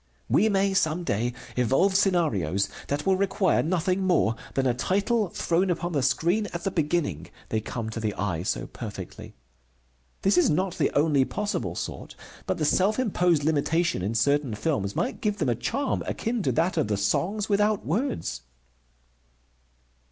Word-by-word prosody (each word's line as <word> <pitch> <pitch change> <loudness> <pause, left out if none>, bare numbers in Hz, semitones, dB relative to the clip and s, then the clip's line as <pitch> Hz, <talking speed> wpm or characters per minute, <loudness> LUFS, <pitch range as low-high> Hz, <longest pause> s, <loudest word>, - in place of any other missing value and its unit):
We 220 - +3
may 195 -1 +2
some 170 -1 +1
day 120 -4 0 0.2
evolve 135 - +2
scenarios 105 - +2 0.2
that 145 +1 -2
will 190 -1 +3
require 195 -1 +2
nothing 180 +3 0
more 180 - +2 0.2
than 135 - +1
a 125 - +3
title 200 - 0
thrown 175 +3 0
upon 175 0 -1
the 145 -4 0
screen 170 - +1
at 170 - -4
the 195 - -1
beginning, 150 - -1 0.2
they 110 - 0
come 110 0 -5
to 115 - -4
the 110 -2 -2
eye 95 -5 -2
so 90 - -2
perfectly. - - -8 0.9
This 195 -1 +4
is - - +4
not 185 +4 0
the - - +3
only 145 -2 +4
possible 205 +9 -3
sort, - - -6 0.3
but - - 0
the 155 - 0
self 190 +7 +2
imposed 180 - +2
limitation 160 - +1
in 105 +5 -2
certain 140 0 +1
films 105 -5 -1
might - - -2
give 210 -1 0
them 135 - 0
a - - +3
charm 275 - -1
akin 230 0 -2
to - - +1
that 170 +3 0
of 155 - +2
the 105 -1 0
Songs 195 - 0
without 210 0 +1
Words. 200 - -2
165 Hz, 165 wpm, -26 LUFS, 125-195 Hz, 0.9 s, This